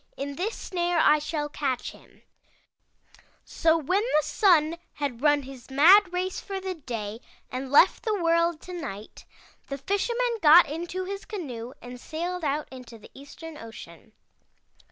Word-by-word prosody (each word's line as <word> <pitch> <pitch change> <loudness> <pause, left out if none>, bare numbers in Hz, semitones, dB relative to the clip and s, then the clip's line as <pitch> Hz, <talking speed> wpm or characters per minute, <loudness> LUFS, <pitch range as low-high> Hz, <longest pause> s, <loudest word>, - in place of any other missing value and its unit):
In 280 +1 -5
this 400 +9 -3
snare 350 -1 -2
I 305 -2 +5
shall 300 0 -3
catch 270 -4 -3
him/ - - -20 1.2
"So 325 -1 +2
when 365 +6 0
the 365 -10 +1
Sun 335 -5 +3 0.2
had 275 -5 -4
run 290 -1 +3
his 265 -2 -12
mad 355 +8 +6
race 365 +1 -2
for 390 -1 -5
the 380 0 -4
day 230 - -6 0.3
and 255 +1 -5
left 295 +6 +5
the 435 -2 -1
world 335 -1 +1
to 365 - -9
night, 230 - -8 0.4
the 275 - -5
Fisherman 465 - -1
got 325 +2 +8
into 345 +5 -4
his 395 +1 -6
canoe 260 - -6
and 245 0 -9
sailed 345 +2 -4
out 295 +1 -1
into 250 -3 -11
the 210 - -16
Eastern 300 +3 -11
ocean. 220 -2 -12
310 Hz, 155 wpm, -26 LUFS, 270-360 Hz, 1.2 s, got